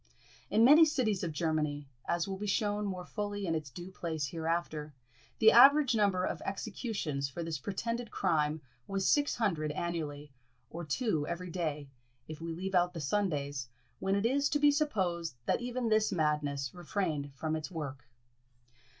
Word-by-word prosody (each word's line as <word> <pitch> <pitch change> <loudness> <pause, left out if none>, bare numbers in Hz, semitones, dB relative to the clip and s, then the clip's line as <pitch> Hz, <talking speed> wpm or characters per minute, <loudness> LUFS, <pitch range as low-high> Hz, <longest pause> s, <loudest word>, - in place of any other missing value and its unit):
In 220 +2 +5
many 300 +5 +9
cities 250 - +1
of 170 - -1
Germany, 150 -2 -1 0.2
as 170 +1 0
will 190 -1 -4
be 210 - -3
shewn 205 0 0
more 185 -2 -4
fully 205 -1 -4
in 165 - 0
its 155 -3 -3
due 175 +8 -9
place 160 -6 -3
hereafter, 160 -3 -3 0.4
the 220 0 +7
average 275 +2 +7
number 200 -4 +2
of - - -3
executions 195 - -3
for 170 +5 -5
this 165 -3 -3
pretended 230 - -3
crime 150 -1 0 0.3
was 195 -1 -1
six 290 -1 +3
hundred 165 -10 0
annually, 150 -3 -4 0.4
or 170 +1 -5
two 160 - -1
every 175 +1 -4
day, 155 -5 -3 0.4
if 155 0 -8
we 165 0 -4
leave 185 +4 -4
out 180 0 +2
the - - -4
Sundays, 145 -6 -1 0.3
when 195 +1 +1
it 200 +2 0
is 280 +4 +2
to 295 - +2
be 290 0 +5
supposed 185 - -1
that - - +1
even 245 -1 -2
this 215 -1 +3
madness 150 -5 0
refrained 165 -5 -2
from 155 +2 -2
its 155 +1 -4
work. 145 -7 -6
175 Hz, 165 wpm, -32 LUFS, 155-210 Hz, 0.4 s, many